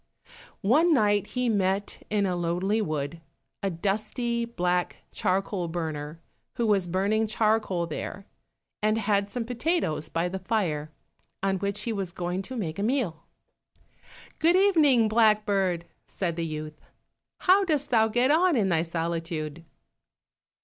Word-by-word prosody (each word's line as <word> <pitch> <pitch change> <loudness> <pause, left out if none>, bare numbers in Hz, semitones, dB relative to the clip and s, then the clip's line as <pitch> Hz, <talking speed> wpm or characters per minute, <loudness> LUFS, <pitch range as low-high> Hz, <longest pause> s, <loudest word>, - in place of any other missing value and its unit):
One 310 - +5
night 205 -4 +2
he 250 -1 -1
met, 200 -2 0
in 210 -1 +1
a 180 -2 0
lonely 175 +5 0
wood, 155 -2 -3 0.4
a 195 - 0
dusty, 215 +6 -1
black 180 -6 -1
charcoal 185 -1 -1
burner, 160 -2 -4 0.4
who 235 - 0
was 200 -4 +2
burning 200 +5 +1
charcoal 215 -5 +1
there, 190 +4 -6 0.6
and 215 +1 +2
had 205 -2 +1
some 235 +2 -3
potatoes 245 - -1
by 165 +2 0
the 190 +2 -4
fire, 175 -7 -1 0.5
on 195 -1 +1
which 200 +1 -2
he 230 - -2
was 195 -4 -4
going 180 +1 -2
to 255 +7 -6
make 165 -5 -3
a - - -1
meal. 215 - -1 1.1
"Good 335 +3 +4
evening, 310 - +5
blackbird!" 210 -5 +2 0.2
said 175 -4 -2
the 165 -1 -2
youth. 155 0 -6 0.6
"How 380 +2 +5
dost 300 -7 0
thou 220 -2 +5
get 245 +5 +2
on 340 +2 +4
in 205 -6 +2
thy 165 -2 +2
solitude?" 165 -1 -3
200 Hz, 140 wpm, -27 LUFS, 170-225 Hz, 1.1 s, One